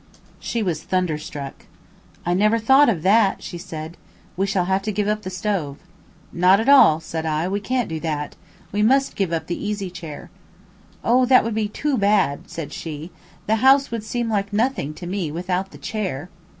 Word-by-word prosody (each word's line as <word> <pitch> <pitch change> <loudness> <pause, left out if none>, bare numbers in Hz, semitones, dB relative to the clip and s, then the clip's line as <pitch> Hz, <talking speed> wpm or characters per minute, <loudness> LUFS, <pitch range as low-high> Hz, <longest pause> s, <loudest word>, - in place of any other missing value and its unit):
She 230 -2 -2
was 165 -5 -2
thunderstruck. 155 -6 -3 0.6
"I 175 - +1
never 215 +5 +3
thought 265 +5 +5
of 170 -8 -1
that," 200 +1 +3
she 175 - -7
said. 160 0 -7 0.4
"We 195 +2 0
shall 195 -2 0
have 190 +1 +1
to 215 - -2
give 205 0 -1
up 210 0 0
the 185 - -6
stove." 185 -7 -2 0.6
"Not 180 +3 +5
at 225 - -2
all," 265 - +7
said 160 0 -5
I, 160 +1 -1
"we 200 +2 -1
can't 250 +4 -1
do 160 -1 -4
that. 150 -2 -3 0.4
We 205 - 0
must 270 +5 +3
give 195 -4 -1
up 165 -1 -2
the 175 - -4
easy 205 -3 -3
chair." 165 -5 -9 0.7
"Oh, 250 +2 +3
that 255 0 +6
would 230 - -2
be 215 -1 0
too 270 +4 -1
bad," 200 -8 +1
said 165 -4 -6
she. 160 +1 -7 0.3
"The 220 +1 +2
house 270 +3 +4
would 230 -2 -3
seem 235 +2 -2
like 200 -2 -1
nothing 215 - -1
to 175 - -8
me 180 -3 -3
without 180 +3 -2
the - - -13
chair!" 185 -7 -4
195 Hz, 190 wpm, -22 LUFS, 165-220 Hz, 0.7 s, all